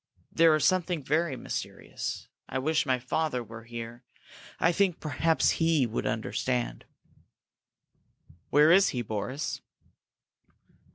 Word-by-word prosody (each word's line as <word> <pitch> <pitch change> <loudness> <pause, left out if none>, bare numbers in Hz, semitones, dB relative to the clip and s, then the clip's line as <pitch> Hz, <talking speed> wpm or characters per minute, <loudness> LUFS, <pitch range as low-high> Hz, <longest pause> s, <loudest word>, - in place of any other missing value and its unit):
There 165 -1 +5
is 155 -2 +1
something 180 -3 +1
very 155 +1 0
mysterious. 125 - -5 0.2
I - - -2
wish 150 +3 +1
my 130 -1 +2
father 125 +1 -1
were 115 0 -11
here! 120 +1 -8 0.6
I 165 - +4
think 185 -1 +1
perhaps 155 +2 +1
he 160 -5 +3
would 115 -1 -3
understand." 110 - -2 1.6
"Where 150 +3 +6
is 190 +2 +6
he, 125 -2 -2
Boris?" 110 +6 -4
140 Hz, 115 wpm, -28 LUFS, 120-165 Hz, 1.6 s, Where